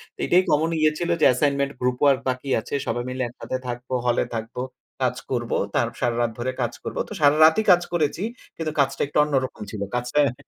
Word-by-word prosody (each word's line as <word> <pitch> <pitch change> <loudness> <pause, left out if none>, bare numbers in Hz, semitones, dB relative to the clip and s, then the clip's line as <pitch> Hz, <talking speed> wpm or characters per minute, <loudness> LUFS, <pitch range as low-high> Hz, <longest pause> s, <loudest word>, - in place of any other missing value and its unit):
তো - - -36
এটাই 180 +1 +4
কমন 155 +3 +2
ইয়ে 155 0 +4
ছিল 175 0 -2
যে, - - +6
অ্যাসাইনমেন্ট 140 +2 +1
গ্রুপ 125 0 +1
ওয়ার্ক 140 -2 +5
বাকি 130 +2 -3
আছে। - - -9
সবাই 120 - -1
মিলে 130 0 -2
একসাথে 125 +2 -5
থাকবো, 125 +1 -5
হলে 120 -1 +2
থাকবো, 115 +2 -4 0.4
কাজ 125 -1 +1 0.2
করব, 120 -2 -2 0.2
তার 120 - +2
সারারাত 120 -1 +1
ধরে 130 +2 -1
কাজ 120 0 -1
করব। - - -5
তো - - -6
সারারাতই 155 +7 +6
কাজ 175 - +6
করেছি, 160 +1 0 0.3
কিন্তু 160 -1 -2
কাজটা 135 0 +1
একটু 145 - -3
অন্যরকম 135 -6 -1
ছিল। 105 - -6
কাজটা 125 +4 0
হ্যাঁ। 140 -4 +2
130 Hz, 200 wpm, -24 LUFS, 120-150 Hz, 0.4 s, যে